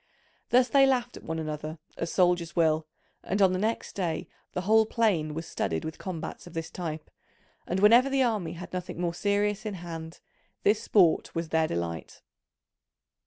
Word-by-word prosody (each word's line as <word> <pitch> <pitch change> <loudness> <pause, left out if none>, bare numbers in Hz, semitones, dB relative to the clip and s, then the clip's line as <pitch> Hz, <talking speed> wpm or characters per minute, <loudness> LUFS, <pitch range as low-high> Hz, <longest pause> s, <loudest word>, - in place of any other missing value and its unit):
Thus 250 +1 +5
they 270 +2 +5
laughed 250 -2 0
at - - -10
one 160 - -3
another 155 0 -4 0.2
as - - -3
soldiers 175 -2 +2
will; 160 -2 +2 0.3
and 195 - -2
on 190 -2 +5
the 185 - -1
next 220 +3 -2
day 170 -5 -2 0.3
the 180 - -1
whole 220 +3 +4
plain 180 -11 +1
was 165 +1 -4
studded 80 - -2
with 160 0 -6
combats 170 -2 -6
of 175 - -12
this 165 0 -4
type, 160 -3 -5 0.6
and 185 - -1
whenever 235 +6 +6
the 270 -1 +3
army 215 -8 -1
had 175 +2 -9
nothing 180 -2 -5
more 175 -1 -1
serious 205 +2 0
in 215 -3 -4
hand, 165 -2 -7 0.4
this 210 +1 +3
sport 185 -7 +3
was 165 -1 -2
their 160 0 +2
delight. 85 - -5
175 Hz, 175 wpm, -28 LUFS, 160-210 Hz, 0.6 s, whenever